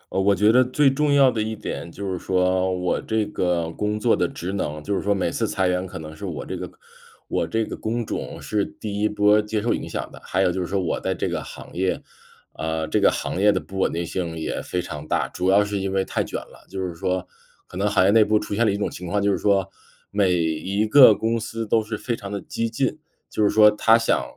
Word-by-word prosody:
嗯， 95 Hz, -, +2 dB
我 100 Hz, 0 st, +4 dB
觉 105 Hz, +2 st, +4 dB
得 125 Hz, +2 st, +6 dB
最 135 Hz, +2 st, +3 dB
重 150 Hz, +2 st, +1 dB
要 140 Hz, -2 st, +6 dB
的 110 Hz, -, -2 dB
一 110 Hz, +1 st, -2 dB
点， 85 Hz, -4 st, -6 dB
就 95 Hz, +2 st, -4 dB
是 90 Hz, -, -4 dB
说 95 Hz, 0 st, +1 dB
我 90 Hz, -1 st, -1 dB
这 110 Hz, -1 st, 0 dB
个 90 Hz, -5 st, -1 dB
工 105 Hz, +4 st, -2 dB
作 115 Hz, +1 st, +3 dB
的 90 Hz, -, +1 dB
职 90 Hz, +3 st, -5 dB
能 75 Hz, -6 st, -3 dB
就 100 Hz, -, -2 dB
是 -, -, -1 dB
说 100 Hz, -, 0 dB
每 90 Hz, -3 st, 0 dB
次 115 Hz, -, -1 dB
裁 95 Hz, -2 st, 0 dB
员， 90 Hz, +1 st, 0 dB
可 -, -, -8 dB
能 80 Hz, 0 st, -8 dB
是 -, -, -12 dB
我 -, -, -4 dB
这 -, -, -5 dB
个 -, -, -6 dB, 0.6 s
我 -, -, -1 dB
这 110 Hz, 0 st, 0 dB
个 -, -, -6 dB
工 115 Hz, +1 st, -3 dB
种 -, -, -5 dB
是 105 Hz, -2 st, -1 dB
第 105 Hz, 0 st, -5 dB
1 105 Hz, -, +2 dB
波 105 Hz, 0 st, +4 dB
接 105 Hz, +1 st, -2 dB
受 115 Hz, +3 st, +1 dB
影 -, -, -4 dB
响 -, -, -4 dB
的。 -, -, -13 dB
还 95 Hz, +1 st, 0 dB
有 90 Hz, -, +3 dB
就 95 Hz, -, -2 dB
是 90 Hz, -, -3 dB
说 100 Hz, +1 st, -1 dB
我 90 Hz, -3 st, -1 dB
在 -, -, -2 dB
这 -, -, -2 dB
个 -, -, -2 dB
行 -, -, -11 dB
业， 95 Hz, +2 st, 0 dB, 0.5 s
呃， 80 Hz, 0 st, -3 dB
这 -, -, +1 dB
个 -, -, +6 dB
行 95 Hz, -, -3 dB
业 105 Hz, +1 st, +6 dB
的 -, -, 0 dB
不 95 Hz, -, -8 dB
稳 -, -, +2 dB
定 85 Hz, +1 st, -2 dB
性 85 Hz, -1 st, -4 dB
也 80 Hz, -, -3 dB
非 90 Hz, -1 st, -3 dB
常 75 Hz, -1 st, -7 dB
大， -, -, 0 dB
主 90 Hz, -, -1 dB
要 100 Hz, +2 st, +5 dB
是 100 Hz, -1 st, -2 dB
因 95 Hz, 0 st, -2 dB
为 95 Hz, 0 st, +1 dB
太 -, -, -1 dB
卷 -, -, -4 dB
了。 -, -, -15 dB
就 95 Hz, -, -6 dB
是 90 Hz, -, -6 dB
说 90 Hz, +2 st, -2 dB, 0.4 s
可 -, -, -14 dB
能 100 Hz, +3 st, 0 dB
行 100 Hz, -2 st, +3 dB
业 100 Hz, -, +5 dB
内 110 Hz, +1 st, +6 dB
部 105 Hz, 0 st, +2 dB
出 105 Hz, -, -5 dB
现 115 Hz, +3 st, +2 dB
了 -, -, +3 dB
一 100 Hz, -, -1 dB
种 100 Hz, -, -2 dB
情 90 Hz, -, -7 dB
况， 100 Hz, +4 st, 0 dB
就 100 Hz, 0 st, +2 dB
是 -, -, 0 dB
说 100 Hz, -3 st, +2 dB, 0.4 s
每 100 Hz, -3 st, +2 dB
一 90 Hz, +5 st, 0 dB
个 125 Hz, -1 st, +8 dB
公 115 Hz, +3 st, 0 dB
司 115 Hz, +1 st, -4 dB
都 110 Hz, +1 st, +2 dB
是 110 Hz, 0 st, -4 dB
非 120 Hz, +1 st, -2 dB
常 100 Hz, -3 st, -8 dB
地 100 Hz, -, -3 dB
激 115 Hz, +4 st, -3 dB
进， 135 Hz, +6 st, -1 dB, 0.3 s
就 -, -, -2 dB
是 105 Hz, -, +4 dB
说 105 Hz, -1 st, +6 dB
它 110 Hz, +2 st, +4 dB
想 115 Hz, -, +1 dB
100 Hz, 285 characters per minute, -23 LUFS, 90-110 Hz, 0.6 s, 个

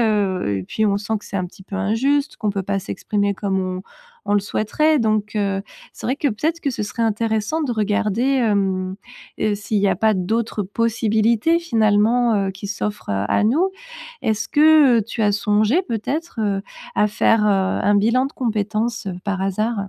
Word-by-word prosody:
heu. 195 Hz, -, +1 dB
Et -, -, -5 dB
puis 220 Hz, -, -1 dB
on 200 Hz, -1 st, +2 dB
sent 215 Hz, +2 st, -3 dB
que -, -, -17 dB
c'est 200 Hz, -, -5 dB
un 185 Hz, -1 st, -1 dB
petit 190 Hz, -, -15 dB
peu 195 Hz, +1 st, -7 dB
injuste, 270 Hz, +9 st, 0 dB
qu'on 210 Hz, -, -1 dB
peut 195 Hz, -1 st, -2 dB
pas 200 Hz, 0 st, -1 dB
s'exprimer 200 Hz, +1 st, -1 dB
comme 195 Hz, -1 st, -1 dB
on 185 Hz, 0 st, -3 dB, 0.4 s
on -, -, 0 dB
le 205 Hz, -, +4 dB
souhaiterait. 300 Hz, +10 st, +1 dB
Donc 215 Hz, -1 st, 0 dB
heu, 195 Hz, -1 st, 0 dB, 0.3 s
c'est -, -, -8 dB
vrai 260 Hz, +3 st, 0 dB
que 290 Hz, -, 0 dB
peut-être 315 Hz, +10 st, -2 dB
que 280 Hz, -, -1 dB
ce 225 Hz, -, -3 dB
serait 230 Hz, +3 st, -3 dB
intéressant 220 Hz, +6 st, 0 dB
de 270 Hz, -, -2 dB
regarder, 215 Hz, +1 st, 0 dB
hem, 200 Hz, -8 st, +1 dB, 0.4 s
heu, 210 Hz, -1 st, +1 dB
s'il 210 Hz, +1 st, -2 dB
y 200 Hz, 0 st, +2 dB
a 185 Hz, -, +1 dB
pas 220 Hz, +1 st, +2 dB
d'autres 215 Hz, +3 st, -1 dB
possibilités 225 Hz, -, +1 dB
finalement, 225 Hz, -4 st, +2 dB
heu, -, -, -1 dB
qui 195 Hz, +1 st, -8 dB
s'offrent, 205 Hz, -, -4 dB
heu, 100 Hz, 0 st, 0 dB
à -, -, +2 dB
nous. 320 Hz, -, +2 dB, 0.5 s
Est-ce 220 Hz, 0 st, -1 dB
que, 300 Hz, -5 st, +6 dB
heu, -, -, -1 dB
tu 225 Hz, -, -5 dB
as 205 Hz, -, +4 dB
songé 215 Hz, -, +2 dB
peut-être, 270 Hz, -, -4 dB
heu, 200 Hz, -2 st, 0 dB, 0.3 s
à 210 Hz, -, +3 dB
faire 215 Hz, +1 st, +2 dB
heu, -, -, +3 dB
un 195 Hz, +1 st, +1 dB
bilan 230 Hz, +6 st, +3 dB
de 280 Hz, -, -9 dB
compétences 220 Hz, -2 st, -2 dB, 0.2 s
par 195 Hz, -2 st, -2 dB
hasard? 200 Hz, +1 st, -1 dB
215 Hz, 195 wpm, -21 LUFS, 200-235 Hz, 0.5 s, que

